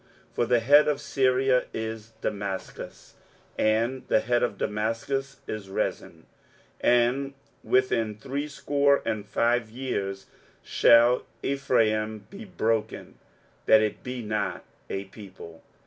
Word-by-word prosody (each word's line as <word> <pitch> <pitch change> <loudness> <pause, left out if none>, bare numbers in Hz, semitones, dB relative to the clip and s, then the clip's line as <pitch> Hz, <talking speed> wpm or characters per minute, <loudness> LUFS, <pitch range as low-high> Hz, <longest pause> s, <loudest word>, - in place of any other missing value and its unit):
23:007:008 - - -34
For 120 - +1
the 120 0 +4
head 145 +5 +6
of 145 -2 +1
Syria 130 -2 +2
is 110 0 -5
Damascus, 100 -2 -5 0.4
and 115 +4 +1
the - - +3
head 120 0 +1
of 120 -5 -1
Damascus 115 +7 -2
is 105 -3 -6
Rezin; 85 -3 -3 0.5
and 125 +3 +2 0.3
within 115 -4 +1
threescore 140 +2 0
and 105 -1 -2
five 115 +1 +1
years 100 -6 -4 0.4
shall 120 +1 +5 0.2
Ephraim 110 -6 0
be 200 +3 -9
broken, 115 - -2 0.5
that 110 0 +7
it 105 - -2
be 125 -1 -5
not 105 -1 -2 0.3
a 95 - -3
people. 95 -5 -12
115 Hz, 115 wpm, -26 LUFS, 110-135 Hz, 0.5 s, that